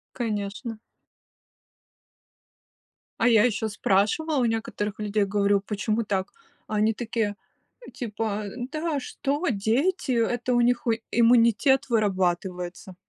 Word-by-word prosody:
Конечно. 215 -1 -3 2.4
А 230 - +3
я 225 -3 +6
ещё 220 -2 0
спрашивала 210 +10 +1
у 250 - +2
некоторых 220 -2 -2
людей, 210 0 0
говорю: 200 0 +2
"Почему 215 +2 -1
так?" 195 -2 -2 0.4
А 215 - -3
они 215 +1 +3
такие 225 -3 -2 0.6
типа: 215 -3 -3 0.3
"Да 310 -1 -1
что, 285 +5 -3
дети, 255 - 0
это 240 +1 0
у 240 - +3
них, 240 0 +2
э, 225 0 +2
иммунитет 240 +3 +4
вырабатывается". 185 -4 -1
220 Hz, 110 wpm, -25 LUFS, 205-240 Hz, 2.4 s, я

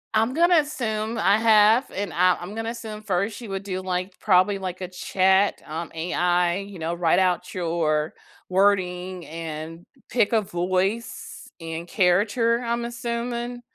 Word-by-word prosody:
I'm 225 +3 +2
gonna 345 +2 +5
assume 230 -6 -2
I 205 -1 +4
have, 220 +2 +5
and 200 -2 -4
I 180 +1 +4
I'm 180 +4 -7
gonna 225 +1 -3
assume 220 -2 -7
first 200 +1 -1
she 235 - -8
would 195 -1 -4
do, 185 -2 -4
like, 185 0 -3
probably, 195 0 +3
like, 185 -1 -5
a 185 - -3
chat, 190 +2 +2
um, 160 +2 -5
AI, 175 +1 +1
you 200 -1 -7
know, 165 +1 -3
write 170 -1 +2
out 180 -2 +1
your 165 -3 0 0.3
wording 185 -2 +1
and 165 +1 -7 0.2
pick 230 -4 +2
a 225 -2 +3
voice 185 +4 -2
and 165 +1 -6
character, 210 +6 +2
I'm 235 0 -2
assuming, 235 0 -4
190 Hz, 155 wpm, -24 LUFS, 180-225 Hz, 0.3 s, gonna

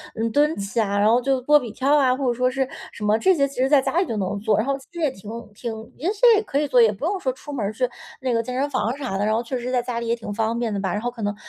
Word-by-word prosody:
嗯， 225 0 -1
蹲 295 +5 +3
起 200 +3 -3
啊， 200 -2 +1
然 205 +1 +4
后 240 +2 +4
就 265 0 +1
波 295 +4 +5
比 245 -4 -6
跳 275 +5 +2
啊， 260 -3 +3
或 270 +1 -3
者 245 - +2
说 250 +1 +1
是 265 +1 0 0.3
什 - - -8
么 210 +1 +3
这 375 +9 +4
些 280 -3 +3
其 275 0 -7
实 260 - +3
在 280 -1 +5
家 315 - -1
里 375 - +2
就 230 - -3
能 200 0 -2
做， 215 +1 +1
然 215 - +1
后 275 0 0
其 270 - -17
实 340 - -7
也 300 -4 +2
挺 205 -3 -12 0.2
挺 220 0 -7
也 315 - -3
是 420 - -14 0.2
也 - - +2
可 275 - -3
以 - - +1
做， 255 -4 +4
也 220 -2 +5
不 205 - -11
用 375 +4 0
说 260 - -1
出 265 +3 -10
门 265 -7 -2
儿 205 - -2
去 250 +2 0 0.3
那 255 -2 0
个 230 - +2
健 250 +2 -5
身 280 +2 0
房 230 -2 -1
啥 255 -9 -3
的， 205 - 0
然 215 +1 +2
后 230 - -1
确 250 +1 -3
实 245 +1 -4
在 250 -1 +1
家 240 -1 -3
里 235 - -4
也 230 - +1
挺 225 -3 -6
方 225 +2 -1
便 235 -2 -1
的 200 - -2
吧。 190 -2 -2
然 210 - -2
后 245 +1 -2
可 235 -2 -10
能 205 0 -1
245 Hz, 375 characters per minute, -23 LUFS, 220-270 Hz, 0.3 s, 波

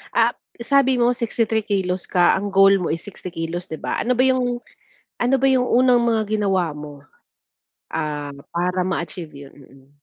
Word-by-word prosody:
Ah, - - +3 0.3
sabi 265 0 +3
mo 240 +1 +4
63 225 -2 0
kilos 190 -3 -1
ka. 175 -2 +3
Ang 200 +1 -4
goal 195 0 +6
mo - - -1
ay 165 - -2
60 190 -2 -9
kilos, 170 +3 -5
'di 160 - -7
ba? - - -2
Ano 250 +2 +1
ba 255 - +4
yung, 245 -2 +1 0.6
ano 250 +2 +3
ba 270 +1 +2
yung 255 -2 +2
unang 245 0 +4
mga 225 -2 +2 0.2
ginawa 185 -6 0
mo, 145 -1 -10 0.9
ah, 150 -2 -3 0.2
para 180 +2 -1
ma-achieve 170 -3 -4 0.2
yun? - - -21
Mm. 135 -1 -18
195 Hz, 175 wpm, -21 LUFS, 165-240 Hz, 0.9 s, goal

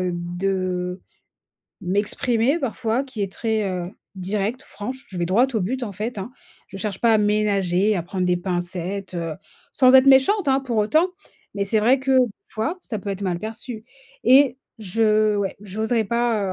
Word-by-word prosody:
heu, 180 -1 -1
de 180 +1 -2 0.8
m'exprimer 225 - +1
parfois, 255 -2 -1
qui 255 -5 -8
est 195 - -2
très, 220 -1 -1
heu, 180 -1 -4 0.3
directe, 205 +7 -2
franche. 255 +2 -7
Je 185 - -7
vais 170 - 0
droit 215 +9 +4
au 220 - +1
but, 250 +8 -2
en 205 - -6
fait, 215 +5 -4
hein. 195 +6 -5 0.4
Je 195 - -9
cherche 195 -1 -4
pas 230 -1 +4
à 215 - +5
ménager, 205 -2 +2
à 175 - -1
prendre 180 +2 -3
des 180 0 +2
pincettes, 180 +1 -4
heu, 165 -2 -3 0.4
sans 255 -2 +5
être 265 +1 +7
méchante, 275 +7 +5
hein, 265 - +4
pour 245 -4 -2
autant, 310 - +3 0.5
mais 200 -1 -1
c'est 220 +2 +3
vrai 255 +5 +4
que 265 -1 +3
p 255 - +6 0.2
fois, 270 +12 -3
ça 220 -9 -5
peut 200 - -5
être 195 0 -5
mal 180 -3 -1
perçu, 220 +2 -7 0.4
et 260 +1 +6 0.2
je 215 +1 +2
ouais, 200 -1 -1
j'oserais 220 +3 -1
pas, 230 -2 0
210 Hz, 180 wpm, -22 LUFS, 190-240 Hz, 0.8 s, être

